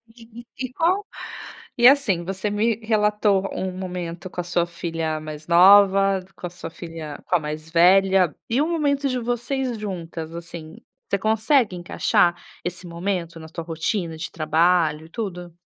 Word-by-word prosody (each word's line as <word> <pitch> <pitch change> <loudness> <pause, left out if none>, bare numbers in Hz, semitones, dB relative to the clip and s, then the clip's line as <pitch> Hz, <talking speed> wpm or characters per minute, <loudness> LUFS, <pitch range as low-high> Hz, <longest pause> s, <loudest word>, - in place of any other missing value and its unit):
E 235 0 -13 0.2
e - - -20
qual 360 +8 +1 0.7
e 240 0 +7
assim, 240 -11 +4
você 195 +3 -3
me 215 +2 +1
relatou 210 -2 +2
um 190 0 -3
momento 180 -2 -5
com 180 - -5
a - - -7
sua 175 0 0
filha 165 -2 -3
mais 155 0 -9
nova, 195 +2 +6 0.2
com 180 - -6
a - - -8
sua 170 -2 -9
filha 165 -4 -8
com 180 - +2
a - - +4
mais 155 +1 -6
velha, 185 0 +4
e 235 +3 +1
o 300 - +2
momento 285 -4 0
de 255 -2 -1
vocês 245 +1 -2
juntas, 170 -5 -6
assim, 170 -1 -9 0.3
você 200 - 0
consegue 220 +1 +2
encaixar 175 0 +1 0.3
esse 180 +1 -5
momento 170 -1 -3
na 160 - -10
tua 165 +1 -7
rotina 165 +1 -3
de 160 - -6
trabalho, 160 0 +2
e 160 - -16
tudo? 180 -5 -6
180 Hz, 165 wpm, -23 LUFS, 165-215 Hz, 0.7 s, e